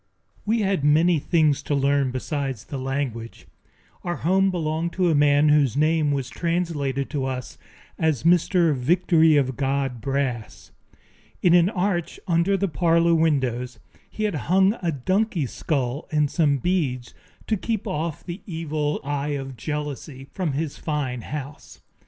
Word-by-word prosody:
We 225 +1 +2
had 195 -7 0
many 160 +3 +4
things 155 -2 +2
to 145 - -1
learn 140 -1 +2
besides 135 -2 -3
the 140 - -6
language. 130 -4 -4 0.6
Our 175 0 -2
home 190 +4 +2
belonged 165 -1 -2
to 180 -2 +2
a - - +2
man 145 0 +4
whose 145 -4 +3
name 155 0 +2
was 135 -3 -1
translated 150 -4 -2
to 140 -3 -2
us 130 -2 -5 0.4
as 155 -6 +1
Mr. 170 -1 +3
Victory 160 +3 +3
of 130 -2 +1
God 135 -2 -1
Brass. 135 -3 -3 0.7
In 175 - +5
an 175 +1 +5
arch 180 -4 -2
under 175 +3 +2
the 200 +1 0
parlor 170 0 +2
windows 130 -7 0 0.3
he 215 - -5
had 210 -2 0 0.2
hung 190 +2 +4
a 170 -2 0
donkey's 175 - -1
skull 135 -2 -2
and 150 -2 +1
some 150 -5 +2
beads, 135 -6 -1 0.3
to 220 - 0
keep 220 +1 -3
off 155 +1 -3
the 175 +2 -6
evil 155 -4 -2
eye 145 +1 -2
of 135 -1 -7
jealousy 145 +1 -5
from 175 -7 -2
his 150 +1 -3
fine 140 -6 -2
house. 145 +2 -8
150 Hz, 150 wpm, -24 LUFS, 135-170 Hz, 0.7 s, In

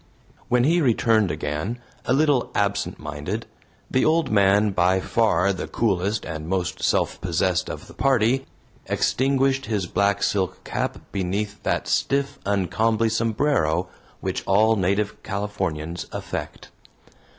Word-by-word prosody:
When 125 0 +3
he 170 +5 +3
returned 115 - +3
again, 75 +9 -3 0.3
a - - +2
little 145 -2 +2
absent 100 0 0
minded, 75 +10 -5 0.5
the 130 - +2
old 160 -3 +2
man, 100 0 +4
by 95 0 +3
far 100 -1 +2
the 95 - -5
coolest 105 -1 0
and 80 0 -5
most 90 -1 -2
self - - +1
possessed 90 +1 0
of - - -6
the - - -14
party, 135 0 +2 0.4
extinguished 135 0 +1
his 105 -5 -1
black 100 +3 +1
silk 95 -2 -1
cap - - -2
beneath 100 +2 -2
that - - -1
stiff, 140 +1 0
uncomely 105 +4 +1
sombrero 110 - +1 0.3
which - - -2
all 110 +3 +4
native 100 +1 0
Californians 95 -5 -3
affect. - - -6
100 Hz, 130 wpm, -24 LUFS, 95-120 Hz, 0.5 s, man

